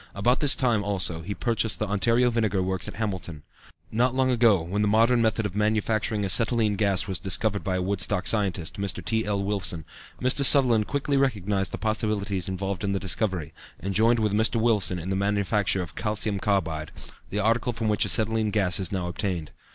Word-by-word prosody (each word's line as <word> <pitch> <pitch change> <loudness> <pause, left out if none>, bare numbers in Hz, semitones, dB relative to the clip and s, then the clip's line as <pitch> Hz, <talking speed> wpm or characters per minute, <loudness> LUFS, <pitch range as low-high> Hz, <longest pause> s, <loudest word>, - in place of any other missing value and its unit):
About 120 +6 +1
this 145 -2 +4
time, 120 -5 +1
also, 95 -5 -1
he 100 +5 -5
purchased 115 -3 0
the 110 - -2
Ontario 115 +5 +2
Vinegar 110 -5 0
Works 95 0 -2
at - - -7
Hamilton. 95 -8 -5 0.5
Not 125 +3 +1
long 130 -1 +2
ago, 115 -7 +3
when 95 +5 -2
the 105 - +2
modern 115 +3 +3
method 110 -1 0
of 100 -2 -4
manufacturing 105 0 0
acetylene 105 +2 0
gas 100 -2 +1
was 95 -4 -2
discovered 100 +2 0
by 95 - -1
a 90 - -1
Woodstock 95 0 0
scientist, 100 -5 -1
Mr. 95 -3 -3
T. 110 +2 0
L. 100 -1 -1
Willson, 95 -5 -1 0.3
Mr. 130 +2 +1
Sutherland 125 -6 +6
quickly 140 0 -1
recognized 100 -8 0
the - - -4
possibilities 105 -4 -2
involved 95 0 -4
in 100 -1 -1
the 100 - -1
discovery, 90 -4 -1 0.3
and 100 +1 -4
joined 115 +4 +3
with 105 -2 0
Mr. 110 +3 +2
Willson 105 -5 +2
in 90 +3 -5
the - - 0
manufacture 100 -1 0
of 85 - -11
calcium 105 -2 -2
carbide, 80 -7 -1 0.4
the 100 - -4
article 115 +4 +1
from 115 -1 -3
which 105 -1 +2
acetylene 110 -1 +1
gas 100 -4 +1
is 95 -3 -3
now 95 -3 -2
obtained. 90 -3 -3
105 Hz, 190 wpm, -25 LUFS, 95-110 Hz, 0.5 s, Sutherland